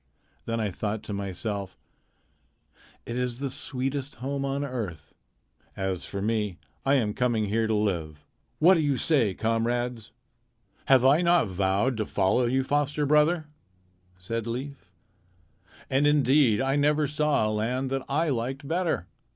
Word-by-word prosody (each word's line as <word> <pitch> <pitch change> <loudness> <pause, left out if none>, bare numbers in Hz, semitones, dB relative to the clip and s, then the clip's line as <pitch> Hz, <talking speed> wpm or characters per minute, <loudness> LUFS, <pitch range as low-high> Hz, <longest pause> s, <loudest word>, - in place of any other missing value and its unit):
Then 115 0 -2
I 105 -3 -1
thought 105 +4 -3
to 110 - -6
myself, 100 0 -4 1.3
'It 115 - -5
is 125 -1 -1
the 135 0 -3
sweetest 135 +2 -3
home 135 +3 -3
on 140 +1 -1
earth.' 105 - -5 0.6
As 95 -2 -2
for 100 -1 -5
me, 105 -4 -1 0.3
I 135 +1 +3
am 110 -6 +1
coming 115 -4 0
here 110 +2 +1
to 110 - +1
live. 85 -8 -2 0.3
What 175 +4 +6
do 175 - +2
you 145 -4 +1
say, 120 - +2
comrades?" 115 0 -1 0.7
"Have 130 -2 +5
I 145 +5 +5
not 170 - +3
vowed 95 +6 0
to 110 - -2
follow 110 +6 +2
you, 130 +2 +1
foster 145 +2 0
brother?" 150 +3 +3 0.7
said 115 +5 -4
Leif. 125 -4 -6 1.0
"And 135 +2 +2
indeed 140 -5 +4
I 135 +1 +1
never 150 +1 +3
saw 150 -5 +1
a - - -1
land 125 +5 -1
that 135 0 0
I 155 +4 +1
liked 135 +2 -3
better. 165 - 0
125 Hz, 150 wpm, -27 LUFS, 105-140 Hz, 1.3 s, What